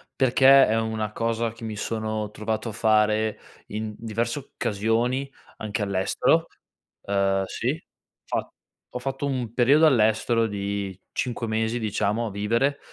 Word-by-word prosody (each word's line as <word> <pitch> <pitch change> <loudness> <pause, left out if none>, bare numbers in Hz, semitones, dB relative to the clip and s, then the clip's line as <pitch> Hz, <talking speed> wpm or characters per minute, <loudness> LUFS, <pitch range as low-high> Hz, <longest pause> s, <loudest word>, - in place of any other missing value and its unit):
perché 135 +1 +6
è 110 +1 +1
una 110 -1 -2
cosa 115 0 -1
che 115 0 -10
mi 110 - -4
sono 110 0 -3
trovato 110 +2 -3
a - - -5
fare 110 0 +2 0.3
in 110 0 -4
diverse 115 +4 -2
occasioni 120 +2 -1 0.3
anche 110 +1 -3
all'estero. 100 -2 +1 0.5
Uhm, 95 -1 +1
sì, - - -2 0.4
fa - - -2 0.4
ho 125 - -4
fatto 135 +2 -3
un 125 -5 -2
periodo 140 +6 +5
all'estero 115 -3 +3
di 100 -2 -3
5 120 -2 -2
mesi, 110 +1 0
diciamo, 105 +1 0
a - - -5
vivere 115 +8 0
110 Hz, 135 wpm, -25 LUFS, 105-120 Hz, 0.5 s, perché